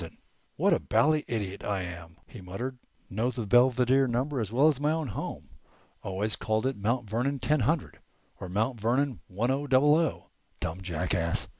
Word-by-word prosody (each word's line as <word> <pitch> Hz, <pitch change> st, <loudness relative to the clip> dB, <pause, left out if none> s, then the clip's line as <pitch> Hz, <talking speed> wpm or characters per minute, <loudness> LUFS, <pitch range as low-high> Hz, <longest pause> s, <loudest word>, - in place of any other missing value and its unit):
"What -, -, +3 dB
a -, -, +2 dB
bally 155 Hz, +1 st, +2 dB
idiot 100 Hz, -4 st, -3 dB
I 100 Hz, -2 st, -1 dB
am!" 85 Hz, -1 st, -8 dB
he 120 Hz, -, -12 dB
muttered. 120 Hz, +8 st, -5 dB, 0.3 s
"Know 110 Hz, +6 st, -1 dB
the 120 Hz, -3 st, -4 dB
Belvedere 125 Hz, +4 st, +4 dB
number 130 Hz, +3 st, -1 dB
as 105 Hz, -2 st, -3 dB
well 135 Hz, +6 st, +4 dB
as 150 Hz, -4 st, +2 dB
my 150 Hz, +1 st, +2 dB
own 160 Hz, -4 st, -1 dB
home. -, -, -6 dB, 0.5 s
Always 100 Hz, +3 st, -1 dB
called 110 Hz, +1 st, -1 dB
it 135 Hz, 0 st, 0 dB
'Mount 115 Hz, +3 st, -1 dB
Vernon 125 Hz, +7 st, -1 dB
ten 150 Hz, +4 st, +1 dB
hundred' 145 Hz, +5 st, -1 dB, 0.4 s
or 90 Hz, -, -6 dB
'Mount 110 Hz, +6 st, -1 dB
Vernon 125 Hz, +1 st, +1 dB
one 110 Hz, +7 st, -1 dB
o 140 Hz, +2 st, -1 dB
double 135 Hz, +3 st, +5 dB
o.' 160 Hz, 0 st, 0 dB, 0.3 s
Dumb 80 Hz, +3 st, -4 dB
jackass! 85 Hz, -1 st, -1 dB
120 Hz, 175 wpm, -28 LUFS, 100-135 Hz, 0.5 s, double